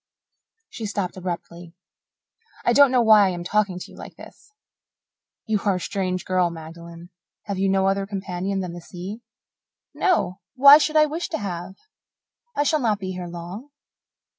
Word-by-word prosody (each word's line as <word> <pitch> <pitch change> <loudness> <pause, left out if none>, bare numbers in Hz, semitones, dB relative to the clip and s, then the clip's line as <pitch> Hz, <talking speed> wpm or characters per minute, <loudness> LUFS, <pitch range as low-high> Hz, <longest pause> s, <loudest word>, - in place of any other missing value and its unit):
She 220 - -5
stopped 200 -3 -3
abruptly. 175 -1 -7 0.9
"I - - +4
don't 285 -1 +7
know 250 -1 +3
why 215 -3 +6
I - - +1
am 175 -1 -4
talking 200 0 0
to 180 - -9
you - - -14
like - - -11
this." - - -15 0.9
"You 220 -2 0
are 200 -2 +2
a - - -2
strange 185 -1 -3
girl, 185 -1 +1
Magdalen. 170 +1 -11 0.3
Have 200 -2 -4
you 195 0 +2
no 190 0 +2
other 195 0 0
companion 195 -1 -3
than 180 -2 -5
the 175 - -8
sea?" 190 +6 -8 0.7
"No. 195 - 0 0.2
Why 280 +3 +9
should 310 0 -1
I 305 0 +6
wish 320 +5 -4
to 330 - -2
have? 185 -1 -5 0.8
I 290 - +2
shall 310 +1 +2
not 220 -6 +1
be 190 -2 -5
here 180 -1 -6
long." 175 +10 -8
190 Hz, 170 wpm, -23 LUFS, 175-215 Hz, 0.9 s, Why